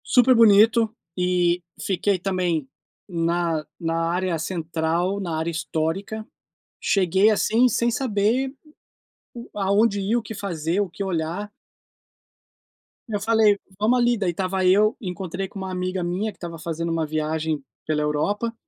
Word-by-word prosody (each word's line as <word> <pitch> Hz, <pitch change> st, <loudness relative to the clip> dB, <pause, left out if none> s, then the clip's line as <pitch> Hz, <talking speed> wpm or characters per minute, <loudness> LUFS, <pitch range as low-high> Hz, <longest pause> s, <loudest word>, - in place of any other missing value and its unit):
Super 250 Hz, +1 st, +5 dB
bonito 220 Hz, 0 st, +5 dB, 0.2 s
e 180 Hz, -1 st, +2 dB, 0.2 s
fiquei 195 Hz, +1 st, 0 dB
também 180 Hz, -5 st, -1 dB, 0.4 s
na 170 Hz, -3 st, 0 dB
na 165 Hz, 0 st, -1 dB
área 180 Hz, -1 st, 0 dB
central, 165 Hz, +3 st, -1 dB
na 170 Hz, -5 st, -3 dB
área 160 Hz, +1 st, -1 dB
histórica, 170 Hz, +7 st, -3 dB, 0.5 s
cheguei, 190 Hz, +2 st, +3 dB
assim, 225 Hz, +3 st, +3 dB
sem 235 Hz, 0 st, +1 dB
saber 240 Hz, +2 st, 0 dB, 1.0 s
aonde 205 Hz, +1 st, +2 dB
ir, 200 Hz, +4 st, +1 dB
o 240 Hz, -, 0 dB
que 220 Hz, +1 st, -8 dB
fazer, 175 Hz, -2 st, -2 dB
o 200 Hz, -, 0 dB
que 200 Hz, +3 st, -5 dB
olhar. 180 Hz, +3 st, -3 dB, 1.6 s
Eu 210 Hz, -3 st, -2 dB
falei: 215 Hz, -1 st, +4 dB, 0.2 s
"Vamos 230 Hz, +4 st, +3 dB
ali", 240 Hz, 0 st, +3 dB
daí 190 Hz, -4 st, 0 dB
estava 185 Hz, +1 st, -1 dB
eu, 210 Hz, +5 st, +4 dB
encontrei 185 Hz, 0 st, -4 dB
com 195 Hz, -, -9 dB
uma 190 Hz, -1 st, -4 dB
amiga 185 Hz, 0 st, -2 dB
minha 185 Hz, +5 st, -1 dB
que -, -, -23 dB
estava 170 Hz, -1 st, -7 dB
fazendo 165 Hz, +1 st, -3 dB
uma 165 Hz, -1 st, 0 dB
viagem 155 Hz, -1 st, -2 dB, 0.2 s
pela 155 Hz, -1 st, 0 dB
Europa, 200 Hz, +10 st, -1 dB
185 Hz, 140 wpm, -23 LUFS, 165-210 Hz, 1.6 s, Super